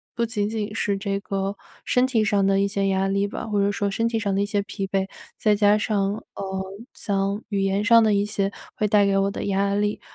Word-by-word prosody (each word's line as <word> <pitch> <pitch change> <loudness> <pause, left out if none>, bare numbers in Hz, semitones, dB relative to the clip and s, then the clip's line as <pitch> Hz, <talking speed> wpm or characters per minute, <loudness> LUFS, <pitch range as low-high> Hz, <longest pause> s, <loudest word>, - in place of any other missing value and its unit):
不 235 -1 +1
仅 215 -3 -1
仅 215 -1 -3
是 205 -2 0
这 195 0 -2
个 195 0 -3 0.3
身 250 0 +3
体 225 -4 +2
上 200 -2 +2
的 195 0 +3
一 200 - +2
些 195 0 -1
压 190 0 +1
力 200 +1 +1
吧， 205 - -6
或 210 -2 0
者 200 +1 +2
说 205 0 -1
身 230 +4 0
体 230 -1 -1
上 205 -3 -1
的 195 - +1
一 200 - +1
些 205 0 0
疲 200 0 -5
惫， 195 0 0 0.3
再 210 -1 +3
加 205 0 +4
上 200 -2 0 0.2
呃， 190 -1 -4 0.3
像 200 0 -1
语 200 -2 0
言 195 +1 +1
上 230 +1 +6
的 220 -1 +3
一 200 0 +2
些 200 -1 -1 0.2
会 210 - 0
带 205 -1 +4
给 195 0 +2
我 195 0 +2
的 - - -5
压 200 0 +1
力。 205 +1 0
200 Hz, 260 characters per minute, -24 LUFS, 195-210 Hz, 0.3 s, 上